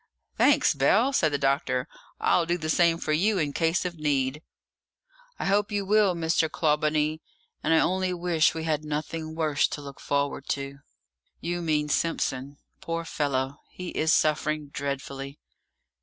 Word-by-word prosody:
"Thanks, 285 - +4
Bell," 210 - +3
said 155 - +3
the 145 - +1
doctor; 135 -2 0 0.3
"I'll 170 -2 +2
do 175 +1 +1
the 155 -2 -2
same 170 0 +3
for 155 -2 -1
you 200 +7 +2
in 150 -5 -1
case 165 +3 +1
of 170 -3 -4
need." 140 -1 0 1.0
"I - - -4
hope 205 +2 +2
you 205 -1 -1
will, 205 -2 +3
Mr. 160 -1 +1
Clawbonny, 155 0 +1 0.4
and 160 - 0
I 160 - +5
only 185 0 +1
wish 170 -3 +2
we 160 - -3
had 155 -2 -1
nothing 155 +1 -4
worse 155 -3 +2
to - - -6
look 140 -2 -10
forward 140 -1 -1
to!" 140 0 -3 0.6
"You 175 +1 -3
mean 150 -3 0
Simpson! 140 -3 -1 0.2
Poor 165 0 -4
fellow, 140 -3 -1
he 180 -1 -7
is 160 0 +1
suffering 155 -1 +1
dreadfully!" 140 0 -5
155 Hz, 155 wpm, -27 LUFS, 145-170 Hz, 1.0 s, I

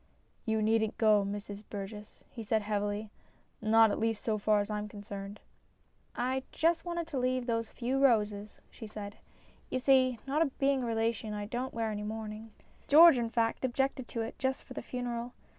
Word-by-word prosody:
" - - -40
You 220 -1 +1
needn't 220 0 +1
go, 215 -2 +4
Mrs 205 +1 -5
Burgess," 210 +1 -8
he 235 - -9
said 220 0 0
heavily, 205 0 -2 0.3
" - - -38
not 220 0 +5
at - - -2
least 225 -1 -1
so 215 -2 0
far 210 0 +3
as 205 +1 -2
I 210 - -1
am 210 - -5
concerned." 205 0 -8 0.4
" - - -39 0.2
I 265 0 0
just 330 +1 +2
wanted 340 -1 -2
to 280 - -2
leave 255 0 0
these 230 -2 -1
few 260 +3 -1
roses," 210 -4 +2
she 225 - -9
said. 205 -1 -8 0.3
" - - -30
You - - -1
see, 255 -1 +4
not 285 +1 0
being 275 -1 +2
a 245 - -2
relation, 225 -1 -1
I 205 0 -4
don't 245 +5 -3
wear 225 -1 -1
any 210 0 -4
mourning. 215 +1 -6 0.4
George, 315 -2 +8
in 230 -1 -1
fact, 230 +1 0
objected 260 0 -1
to 230 - -3
it 225 - -6
just 265 0 -1
for 255 - -11
the - - -5
funeral. 245 -1 -4
225 Hz, 200 wpm, -31 LUFS, 210-255 Hz, 0.4 s, George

